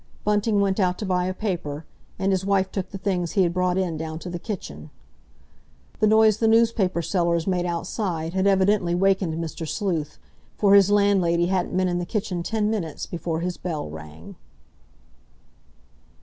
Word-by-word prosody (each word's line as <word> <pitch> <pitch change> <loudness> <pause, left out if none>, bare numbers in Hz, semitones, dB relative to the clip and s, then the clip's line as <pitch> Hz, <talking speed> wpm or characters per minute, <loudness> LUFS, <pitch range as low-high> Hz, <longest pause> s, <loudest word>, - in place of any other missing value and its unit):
Bunting 210 0 +1
went 195 0 +1
out 180 -2 +1
to 210 - -4
buy 180 -2 0
a 185 - -1
paper, 165 -8 -4 0.3
and 195 +1 0
his 190 -1 0
wife 195 -1 +1
took 190 -2 -4
the 195 - -7
things 185 -3 -2
he 195 - +4
had 170 -1 0
brought 180 0 +1
in 180 -4 -1
down 160 0 -5
to 175 +2 -7
the 175 - -4
kitchen. 75 - -7 1.1
The 215 - +4
noise 220 -1 +5
the 225 - +1
newspaper 220 -6 +2
sellers 170 -2 0
made 180 -2 0
outside 170 -1 -3
had 190 +1 +1
evidently 190 -2 +2
wakened 190 -3 +1
Mr. 165 0 -5
Sleuth, 165 -6 -2 0.4
for 200 -1 +4
his 200 -1 +6
landlady 195 -4 +3
hadn't 185 -1 -1
been 185 0 +2
in 175 0 -1
the 175 - -3
kitchen 190 -4 -2
ten 210 +4 -1
minutes 170 -9 -3
before 165 -1 -4
his 180 0 -3
bell 155 - -4
rang. 80 +1 -11
185 Hz, 175 wpm, -24 LUFS, 170-200 Hz, 1.1 s, his